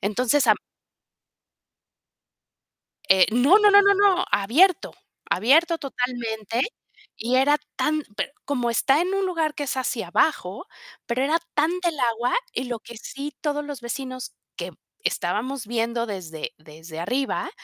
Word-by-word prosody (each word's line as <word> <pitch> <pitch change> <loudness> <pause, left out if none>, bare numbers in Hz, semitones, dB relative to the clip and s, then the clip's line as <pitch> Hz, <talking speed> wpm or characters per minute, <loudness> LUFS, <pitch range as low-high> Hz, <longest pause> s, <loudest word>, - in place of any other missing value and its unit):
Entonces, 245 +6 +1
a - - +9
m - - -1 2.5
Eh, 190 -1 +7
no, 275 - +5
no, 420 -1 +6
no, 405 0 +8
no, 400 0 +5
no, 390 -2 +3
abierto 325 - +3 0.4
abierto 320 - +3
totalmente, 240 -4 -2 0.5
y 240 +3 0
era 285 +3 +4 0.2
tan 305 0 0
pero 280 - -3
como 250 -4 -1
está 270 +6 +3
en 370 +2 -1
un 390 0 0
lugar 325 -4 -1
que 290 - -3
es 265 - -2
hacia 245 -6 -2
abajo, 205 - 0 0.4
pero 240 +2 0
era 315 +4 +2 0.2
tanta 345 +4 +1
el 305 -4 -8
agua, 240 0 0 0.2
y 255 - -2
lo 240 -2 -4
que 235 - -12
sí, 280 +5 -7
todos 295 -1 -2
los 290 -3 -7
vecinos 255 +1 -5 0.2
que - - -5 0.3
estábamos 245 +1 -2
viendo 235 0 -1
desde 175 -7 -6
desde 160 +1 -11
arriba, 260 - -1
255 Hz, 145 wpm, -24 LUFS, 230-310 Hz, 2.5 s, a